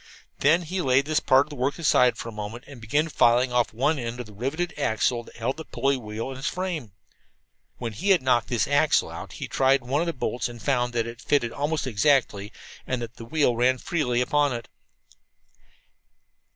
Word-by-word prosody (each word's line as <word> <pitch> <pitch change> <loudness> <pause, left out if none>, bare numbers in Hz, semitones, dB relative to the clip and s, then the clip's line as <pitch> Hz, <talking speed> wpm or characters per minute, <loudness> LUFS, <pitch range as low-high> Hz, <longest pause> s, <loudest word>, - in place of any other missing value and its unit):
He - - +3
then 170 +3 +4 0.2
laid 130 +2 +4
this 155 0 +1
part 135 +2 +4
of - - -20
the - - -7
work 135 +2 -1
aside 125 -7 +3
for - - -6
a - - -5
moment 105 +3 -7
and 135 -5 -12
began 145 +9 +1
filing 125 -3 +3
off 120 -1 +2
one 140 +6 0
end 120 0 -5
of 125 - -5
the 105 - -14
riveted 150 - -3
axle 120 +2 0
that - - -16
held 125 +5 -2
the 160 - -6
pulley 135 +3 0
wheel 115 +1 -5
in 130 - -8
its 135 - -3
frame. 170 - -3 0.8
When 115 -3 -5
he 190 - -2
had 185 -8 +4
knocked 125 -3 +2
this 120 -2 0
axle 145 +2 +2
out - - -8
he - - -6
tried 135 0 +3
one 135 +5 0
of 170 - -1
the 170 - -1
bolts 125 -2 -2
and 120 -1 -10
found 125 -1 0
that 115 -1 0
it 115 +1 -8
fitted 120 -6 +1
almost 145 +3 -2
exactly, 115 -4 +1 0.4
and 130 - -1
that 120 0 -7
the 115 - -9
wheel 145 -2 +1
ran 125 +2 +3
freely 125 -6 -1
upon 145 +2 +2
it. 115 -1 -6
125 Hz, 210 wpm, -25 LUFS, 120-145 Hz, 0.8 s, then